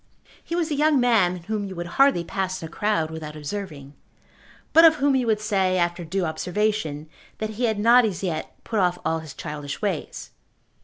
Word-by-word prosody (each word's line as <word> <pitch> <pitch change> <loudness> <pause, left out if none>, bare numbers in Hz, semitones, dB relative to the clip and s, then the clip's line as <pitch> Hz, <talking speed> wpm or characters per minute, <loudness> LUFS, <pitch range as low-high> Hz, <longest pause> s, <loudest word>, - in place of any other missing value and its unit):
He 335 - -4
was 340 -2 -1
a - - +1
young 300 -1 +3
man 190 -8 +2
whom 215 +2 -3
you 195 -1 -6
would 175 0 -4 0.2
hardly 275 -11 +4
pass 185 +1 -3
in - - -4
a - - -17
crowd 170 -6 0
without 155 -1 -7
observing, 150 -3 -6 0.8
but 330 - +8
of 320 -1 +8
whom 280 -2 +2
you 255 -2 +1
would 215 -2 +2
say, 190 -3 +1
after 175 0 0
due 185 +3 -2
observation, 170 -2 -2 0.3
that 215 0 -3
he 235 +3 -1
had 220 -2 0
not 235 +4 +6
as 200 -4 -2
yet 160 -4 -3
put 220 - -2
off 180 -2 +2
all 160 - 0
his 160 -3 -10
childish 150 -2 -6
ways. 195 -7 -4
190 Hz, 200 wpm, -24 LUFS, 160-220 Hz, 0.8 s, but